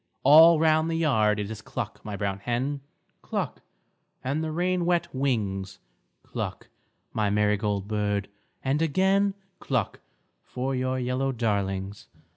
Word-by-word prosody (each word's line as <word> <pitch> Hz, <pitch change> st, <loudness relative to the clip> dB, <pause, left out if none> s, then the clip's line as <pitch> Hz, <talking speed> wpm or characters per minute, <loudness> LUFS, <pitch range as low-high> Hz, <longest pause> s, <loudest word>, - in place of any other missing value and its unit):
All 160 Hz, +4 st, +8 dB
round 155 Hz, 0 st, +3 dB
the 165 Hz, -, -1 dB
yard 110 Hz, -10 st, +2 dB
it 105 Hz, +1 st, -3 dB
is 110 Hz, -1 st, -7 dB
cluck, -, -, -6 dB
my 105 Hz, -2 st, -5 dB
brown 100 Hz, -1 st, -2 dB
hen, 130 Hz, +6 st, -2 dB, 0.4 s
Cluck, -, -, -3 dB, 0.6 s
and 140 Hz, +5 st, -1 dB
the 160 Hz, -, -2 dB
rain 180 Hz, +2 st, 0 dB
wet 175 Hz, 0 st, +1 dB
wings, 105 Hz, -8 st, -1 dB, 0.5 s
Cluck, -, -, -5 dB, 0.4 s
my 105 Hz, -2 st, +1 dB
marigold 105 Hz, -1 st, +1 dB
bird, 105 Hz, -1 st, -1 dB, 0.4 s
and 135 Hz, +3 st, +1 dB
again 190 Hz, +5 st, +2 dB, 0.2 s
Cluck 125 Hz, -8 st, -1 dB, 0.4 s
for 130 Hz, +2 st, -3 dB
your 130 Hz, 0 st, -1 dB
yellow 130 Hz, +2 st, 0 dB
darlings. 100 Hz, -4 st, -2 dB
125 Hz, 130 wpm, -26 LUFS, 105-155 Hz, 0.6 s, All